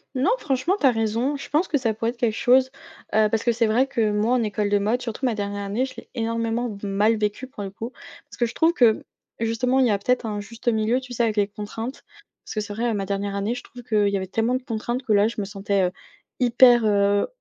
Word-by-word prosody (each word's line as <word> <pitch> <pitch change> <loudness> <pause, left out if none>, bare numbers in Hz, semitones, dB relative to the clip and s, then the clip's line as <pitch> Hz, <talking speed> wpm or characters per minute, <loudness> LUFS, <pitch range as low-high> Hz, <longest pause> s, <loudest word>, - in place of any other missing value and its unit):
Non, 270 - +2
franchement, 275 +7 0
tu - - +1
as 265 - +7
raison, 225 +5 0
je 280 - -8
pense 320 +5 +1
que 295 - +1
ça 230 -5 0
pourrait 225 +2 -1
être 245 - -17
quelque 235 -3 +1
chose, 255 +2 +4 0.5
heu, 215 -1 +4
parce 220 0 0
que 240 - +3
c'est 230 0 +1
vrai 250 +5 +2
que 230 -5 0
moi 215 +4 +1
en 250 - +2
école 210 -1 -1
de 205 0 +3
mode, 220 +5 0
surtout 235 +2 -4
ma 240 -3 +1
dernière 205 -1 -3
année, 210 +6 0
je 265 - -10
l'ai - - -11
énormément 230 +1 -1
v 205 -1 -6
mal 210 +3 +2
vécue, 210 +4 -2
pour 230 -5 -9
le 195 - -4
coup, 225 +5 -7 0.3
parce - - -15
que 240 - +2
je 230 - -5
trouve 330 +1 +3
que, 235 -8 +3 0.4
justement, 230 +3 +1
il 260 - +5
y - - +2
a 205 - +2
peut-être 250 +5 0
un 210 -2 -3
juste 230 +4 -3
milieu, 225 +2 +1
tu 255 -1 -9
sais, 235 0 +1
avec 220 -2 0
les 205 - +3
contraintes. 220 +5 -7 0.4
Parce - - -7
que 215 - 0
c'est 210 -1 -6
vrai, 235 +3 -1
heu, 225 - 0
ma 195 -1 -2
dernière 200 0 -2
année, 200 +3 -1
je - - -7
trouve 245 -1 -12
qu'il 215 -3 +2
y 200 - 0
avait 190 - -4
tellement 225 +6 0
de 255 - -3
contraintes 240 +2 -3
que 230 - -3
là, 205 +1 +4
je 230 - -5
me - - -3
sentais, 200 -1 -1
heu, 180 - +1 0.5
hyper, 240 -1 +6
heu, 200 -1 +3
225 Hz, 270 wpm, -24 LUFS, 205-245 Hz, 0.5 s, as